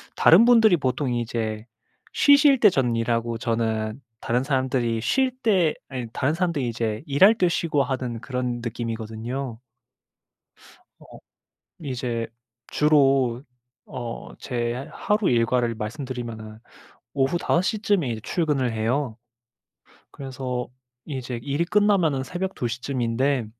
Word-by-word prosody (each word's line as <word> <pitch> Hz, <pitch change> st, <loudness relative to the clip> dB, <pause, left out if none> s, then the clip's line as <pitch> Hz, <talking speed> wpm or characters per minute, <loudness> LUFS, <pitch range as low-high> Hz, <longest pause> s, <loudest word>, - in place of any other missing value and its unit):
다른 190 Hz, +8 st, +7 dB
분들이 225 Hz, -6 st, +6 dB
보통 130 Hz, -2 st, -1 dB
이제 110 Hz, -2 st, -3 dB, 0.5 s
쉬실 285 Hz, -1 st, +5 dB
때 215 Hz, -, +7 dB
전 125 Hz, -9 st, 0 dB
일하고 115 Hz, 0 st, -1 dB
저는 115 Hz, 0 st, -2 dB, 0.2 s
다른 120 Hz, +4 st, 0 dB
사람들이 130 Hz, -4 st, 0 dB
쉴 260 Hz, -, +1 dB
때 185 Hz, -9 st, +2 dB
아니 125 Hz, -3 st, -5 dB
다른 140 Hz, +3 st, 0 dB
사람들이 165 Hz, -6 st, -1 dB
이제 115 Hz, -1 st, -3 dB
일할 180 Hz, +9 st, +5 dB
때 185 Hz, -5 st, +2 dB
쉬고 160 Hz, -4 st, +1 dB
하는 125 Hz, -3 st, -3 dB
그런 125 Hz, -2 st, -3 dB
느낌이거든요. 115 Hz, +2 st, -5 dB, 1.4 s
어 -, -, -14 dB, 0.6 s
이제 125 Hz, -5 st, -3 dB, 0.4 s
주로 135 Hz, -5 st, +3 dB, 0.4 s
어 120 Hz, -2 st, -7 dB
제 120 Hz, -2 st, -2 dB, 0.2 s
하루 210 Hz, -1 st, 0 dB
일과를 120 Hz, 0 st, +1 dB
말씀드리면은 115 Hz, -2 st, -6 dB, 0.5 s
오후 135 Hz, +4 st, +1 dB
5 170 Hz, -, +1 dB
시쯤에 205 Hz, -, 0 dB
이제 115 Hz, -2 st, -3 dB
출근을 140 Hz, -, 0 dB
해요. 115 Hz, +2 st, -1 dB, 0.9 s
그래서 130 Hz, -2 st, -5 dB, 0.4 s
이제 130 Hz, -4 st, -5 dB
일이 145 Hz, +3 st, 0 dB
끝나면 190 Hz, -8 st, +2 dB
새벽 185 Hz, +6 st, -4 dB
2 120 Hz, -, -2 dB
시쯤인데 125 Hz, +1 st, -1 dB
130 Hz, 245 characters per minute, -24 LUFS, 115-150 Hz, 1.4 s, 다른